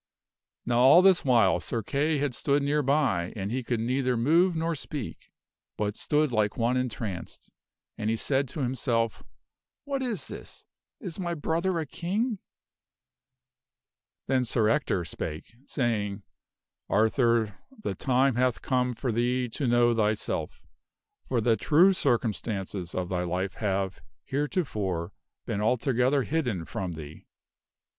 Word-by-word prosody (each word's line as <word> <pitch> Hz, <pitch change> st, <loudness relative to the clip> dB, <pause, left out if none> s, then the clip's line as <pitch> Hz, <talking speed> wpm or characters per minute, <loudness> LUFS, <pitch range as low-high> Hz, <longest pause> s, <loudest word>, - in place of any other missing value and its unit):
Now 120 Hz, -1 st, +2 dB
all 135 Hz, +8 st, +8 dB
this 190 Hz, -2 st, +5 dB
while 115 Hz, -8 st, +4 dB
Sir 115 Hz, -2 st, -3 dB
Kay 150 Hz, +7 st, 0 dB
had 140 Hz, -2 st, -1 dB
stood 140 Hz, +3 st, +1 dB
near 145 Hz, +1 st, +2 dB
by 135 Hz, -, +1 dB
and 100 Hz, 0 st, -3 dB
he 130 Hz, +2 st, -1 dB
could 120 Hz, -1 st, -1 dB
neither 125 Hz, +2 st, 0 dB
move 165 Hz, +9 st, +3 dB
nor 165 Hz, +1 st, 0 dB
speak, 145 Hz, -4 st, -6 dB, 0.5 s
but 105 Hz, -1 st, -1 dB
stood 150 Hz, +1 st, +1 dB
like 110 Hz, -2 st, +1 dB
one 120 Hz, +2 st, +1 dB
entranced, 115 Hz, -7 st, -4 dB, 0.5 s
and 105 Hz, 0 st, -1 dB
he 115 Hz, -, +2 dB
said 135 Hz, +4 st, 0 dB
to 145 Hz, +4 st, -5 dB
himself, 120 Hz, -3 st, 0 dB, 0.6 s
"What 275 Hz, -1 st, -2 dB
is 240 Hz, -6 st, -3 dB
this? -, -, -9 dB, 0.3 s
Is 185 Hz, -5 st, -6 dB
my 175 Hz, -2 st, -2 dB
brother 170 Hz, +4 st, 0 dB
a 160 Hz, -, -2 dB
King?" 200 Hz, -, -2 dB, 1.9 s
Then 130 Hz, -1 st, +2 dB
Sir 110 Hz, -2 st, +2 dB
Ector 110 Hz, -, +1 dB
spake, 75 Hz, +4 st, -6 dB
saying, 105 Hz, -6 st, -1 dB, 0.3 s
" -, -, -65 dB, 0.3 s
Arthur, 110 Hz, 0 st, +2 dB, 0.2 s
the -, -, -1 dB
time 130 Hz, -1 st, +2 dB
hath 125 Hz, -1 st, +1 dB
come 125 Hz, -1 st, +1 dB
for 125 Hz, +1 st, -2 dB
thee 125 Hz, +2 st, +1 dB
to 130 Hz, +4 st, -2 dB
know 120 Hz, 0 st, +4 dB
thyself, 110 Hz, -1 st, -1 dB, 0.6 s
for 125 Hz, -, +1 dB
the 115 Hz, 0 st, +3 dB
true 165 Hz, -, +5 dB
circumstances 105 Hz, -, -1 dB
of 90 Hz, -1 st, -1 dB
thy 90 Hz, -1 st, -1 dB
life 90 Hz, +2 st, -2 dB
have, 95 Hz, -4 st, -2 dB, 0.2 s
heretofore, 105 Hz, -, -2 dB, 0.3 s
been 100 Hz, -, -2 dB
altogether 125 Hz, +4 st, +2 dB
hidden 125 Hz, -, -1 dB
from 95 Hz, -4 st, -4 dB
thee. 80 Hz, -1 st, -10 dB
125 Hz, 140 wpm, -28 LUFS, 105-145 Hz, 1.9 s, all